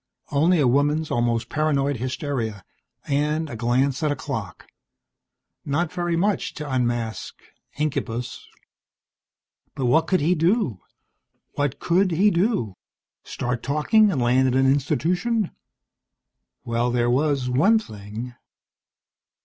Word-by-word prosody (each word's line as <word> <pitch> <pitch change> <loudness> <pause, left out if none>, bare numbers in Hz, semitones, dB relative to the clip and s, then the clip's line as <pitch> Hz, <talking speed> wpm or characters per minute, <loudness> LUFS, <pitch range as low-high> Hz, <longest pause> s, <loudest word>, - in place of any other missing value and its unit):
Only 160 +5 +3
a 140 - +4
woman's 145 +4 +1
almost 120 -1 0
paranoid 145 -3 0
hysteria, 125 - -3 0.4
and 150 +2 0
a - - -5
glance 125 +5 +1
at 150 -2 +1
a - - 0
clock. - - -6 1.0
Not 160 +4 -1
very 175 -2 -1
much 195 +4 0
to 150 - -6
unmask 120 -4 -2 0.4
incubus. 125 -5 -3 1.3
And 130 - 0
what 160 +7 +3
could 185 - +2
he 160 +5 +2
do? 165 - +1 0.7
What 145 -2 -1
could 185 +3 +2
he 190 +5 +3
do? 175 - 0 0.5
Start 125 -1 -3
talking 195 - +3
and 150 - -1
land 125 +2 +3
in 130 - 0
an 135 0 +3
institution? 170 - +1 1.1
Well, 120 +1 0
there 120 0 +1
was 140 -1 +1
one 155 - +4
thing. 110 - -7
140 Hz, 120 wpm, -23 LUFS, 125-165 Hz, 1.3 s, a